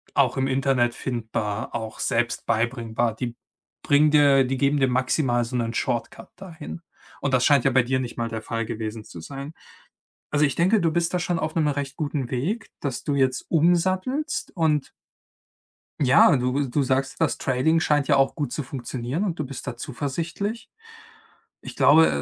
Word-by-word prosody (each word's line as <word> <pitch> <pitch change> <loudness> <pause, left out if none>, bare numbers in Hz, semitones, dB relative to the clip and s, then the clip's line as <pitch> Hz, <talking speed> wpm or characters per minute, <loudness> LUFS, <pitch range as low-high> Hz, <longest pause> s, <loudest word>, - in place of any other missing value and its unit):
auch 130 -4 +3
im 135 - +1
Internet 130 -3 +1
findbar, 110 -4 -3
auch 110 -2 -5
selbst 120 0 -1
beibringbar. 115 0 0
Die 120 0 -4 0.5
bringen 145 +1 +4
dir 140 -3 +5
die 130 +1 -2
geben 140 +2 +2
dir 135 - +3
maximal 125 -1 +1
so 120 +2 -6
'nen 115 -1 -1
Shortcut 120 +1 -3
dahin, 170 -3 -9 0.4
und 140 - -1
das 125 -1 +3
scheint 140 -4 +4
ja 135 - +4
bei 130 0 +4
dir 130 +2 0
nicht 125 -2 -5
mal 115 0 -2
der 110 0 -4
Fall 115 0 -3
gewesen 110 0 -5
zu 85 - -10
sein. 140 - -8 0.8
Also, 150 0 +3
ich 140 - -1
denke, 190 +6 +3
du 165 - +2
bist 170 +1 0
da 180 - +1
schon 175 -1 -1
auf 155 - -3
'nem 155 -2 +2
recht 140 -2 -3
guten 145 -5 -2
Weg, 185 - -2
dass 135 -4 -3
du 145 - -1
jetzt 130 -2 +1
umsattelst 185 - +1
und 155 -4 +1 1.1
Ja, 135 0 +6
du 130 +2 0
du 145 +4 +1
sagst, 130 +1 -1
das 160 - +1
Trading 155 +5 +1
scheint 145 -2 +2
ja - - +3
auch 135 +2 +2
gut 145 -5 -3
zu 150 - -2
funktionieren 130 - -4
und 175 -4 -2
du - - 0
bist 135 -1 -8
da 120 - -4
zuversichtlich. 165 - -4 0.9
Ich - - -8
glaube, 160 +3 +6
135 Hz, 180 wpm, -24 LUFS, 120-155 Hz, 1.1 s, Ja